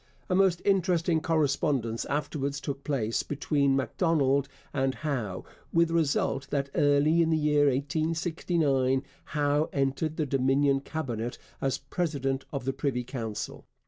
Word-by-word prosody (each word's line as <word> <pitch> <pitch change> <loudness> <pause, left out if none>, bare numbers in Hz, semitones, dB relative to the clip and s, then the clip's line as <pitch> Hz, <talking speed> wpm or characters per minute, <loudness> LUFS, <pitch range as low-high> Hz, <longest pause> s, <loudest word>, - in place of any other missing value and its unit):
A - - +3
most 190 -2 +3
interesting 175 -4 +2
correspondence 140 -7 0
afterwards 140 -1 -2
took 140 -1 -5
place 115 -6 0
between 140 -1 +1
Macdonald 140 -1 +1 0.3
and 135 0 0
Howe, 120 -11 -3 0.3
with 170 0 +3
the - - -3
result 140 -4 +1
that 140 -1 -1
early 150 +1 +4
in 165 - +2
the 160 - +3
year 150 -1 +3
1869 145 -1 +1 0.2
Howe 145 +1 +1
entered 140 +3 -1
the 155 - +1
Dominion 135 +1 +2
Cabinet 120 -6 -4 0.2
as 135 -1 0
president 140 -6 -2
of 135 -3 -4
the 135 - 0
Privy 135 -2 -1
Council. 115 -4 -5
140 Hz, 135 wpm, -28 LUFS, 135-160 Hz, 0.3 s, early